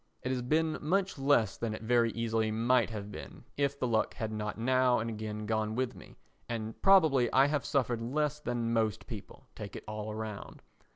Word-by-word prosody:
It 130 - -1
has 130 -1 -1
been 155 +5 +1
much 185 +1 0
less 135 -7 +3
than 115 -2 -2
it 110 - -9
very 120 0 +3
easily 115 -1 0
might 115 +2 +2
have 105 -2 -6
been - - -9
if 140 0 0
the - - 0
luck 115 -3 +1
had 110 -1 -3
not 105 -1 -3
now 130 +1 +3
and 115 +1 -2
again 105 -1 -5
gone 110 0 -1
with 130 0 -1
me, - - -14 0.3
and 110 -1 -4
probably 160 -11 +5
I 135 +1 +6
have 145 0 0
suffered 125 -4 0
less 150 +5 -1
than 120 -4 -2
most 110 -2 0
people, 105 -4 -9
take - - -8
it - - -7
all 105 0 -5
round. 110 -2 -7
115 Hz, 195 wpm, -31 LUFS, 110-135 Hz, 0.3 s, I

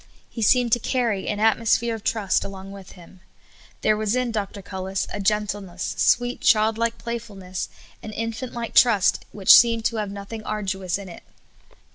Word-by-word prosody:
He 230 - -6
seemed 240 +2 +3
to 240 - +4
carry 230 -5 -1
an 210 - -2
at 225 +2 +3
mosphere 230 +1 +1
of 220 -2 -7
trust 210 -4 0
along 195 0 -8
with 195 -2 -11
Him. 180 +1 -16 0.6
There 215 - +3
was 215 +1 -1
in 250 -1 0
Dr. 205 -2 -4
Cullis 190 0 -3
a 205 - -4
gentleness, 205 -3 -2
sv/eet, 245 +1 +2
child 220 -1 +4
like 230 0 0
playfulness 210 -6 -6 0.3
and 215 - -8
infant 230 +2 -4
like 235 -1 -5
trust 220 -7 +4
which 195 -2 +6
seemed 230 -2 +4
to 230 - 0
have 210 -2 -2
nothing 200 +3 -7
arduous 195 -4 -3
in 200 -1 -9
it. 175 - -11
215 Hz, 175 wpm, -23 LUFS, 195-230 Hz, 0.6 s, which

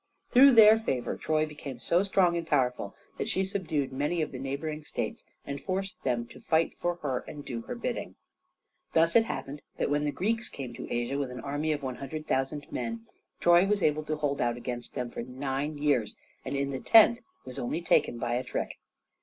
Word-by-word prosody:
Through 270 +2 +8
their 220 -1 +8
favor 130 - -2
Troy 155 0 +1
became 145 -4 -8
so 170 +10 +2
strong 190 -3 +3
and 170 -1 -3
powerful 125 -7 0 0.2
that - - -1
she 190 - +1
subdued 160 -9 -2
many 150 +5 0
of - - -5
the 130 - -6
neighboring 150 +3 -4
states - - -4 0.2
and 140 0 -5
forced 195 +1 -3
them 120 -2 0
to - - -13
fight 160 0 +1
for 175 0 0
her 130 -4 0
and 145 -1 -8
do 115 -2 -4
her - - -6
bidding. - - -4 0.8
Thus 165 +1 +4
it 225 -1 +6
happened 145 -9 -5 0.2
that - - 0
when 145 0 +2
the 145 - 0
Greeks 225 +9 -1
came 130 -4 -7
to 125 - -8
Asia 120 +4 -1
with 140 -2 -2
an 125 0 -7
army 145 +3 -1
of 145 -2 -2
100,000 135 +1 -3
men, 230 0 -4 0.3
Troy 175 +2 +5
was 205 -1 +1
able 150 0 +2
to 155 - -1
hold 145 -2 -1
out 120 0 +1
against 120 0 -6
them 125 -1 -3
for - - -5
nine 135 +4 -3
years, 145 -7 +1 0.3
and - - -4
in 140 0 -1
the 135 - -3
tenth 225 - +6 0.2
was 125 - -7
only 125 +7 -2
taken 120 - +3
by 120 0 -2
a 125 +1 0
trick. 125 - -4
145 Hz, 205 wpm, -29 LUFS, 130-170 Hz, 0.8 s, Through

